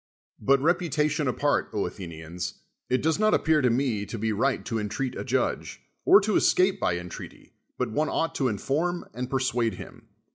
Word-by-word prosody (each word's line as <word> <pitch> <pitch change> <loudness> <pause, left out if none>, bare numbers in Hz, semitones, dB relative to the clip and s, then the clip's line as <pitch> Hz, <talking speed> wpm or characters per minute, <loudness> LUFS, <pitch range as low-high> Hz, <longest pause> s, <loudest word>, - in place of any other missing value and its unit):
But 135 +6 +3
reputation 155 -3 +1
apart, 145 +3 +1
Athenians, 90 -3 -5 0.3
it 130 0 +1
does 160 +4 +1
not 215 0 +4
appear 160 -1 +3
to 125 - +3
me 115 -4 0
to 115 - -5
be 110 0 -1
right 130 +6 0
to 115 -2 -2
entreat 110 +5 -3
a - - -4
judge, - - -1 0.3
or 385 +3 +8
to 215 - 0
escape 185 +1 +3
by 85 - +1
entreaty, 90 0 -9 0.2
but - - -1
one 150 +7 0
ought 165 - 0
to 135 - +2
inform 155 - -1
and 125 +2 -4
persuade 125 -4 0
him. - - -11
130 Hz, 175 wpm, -26 LUFS, 110-155 Hz, 0.3 s, or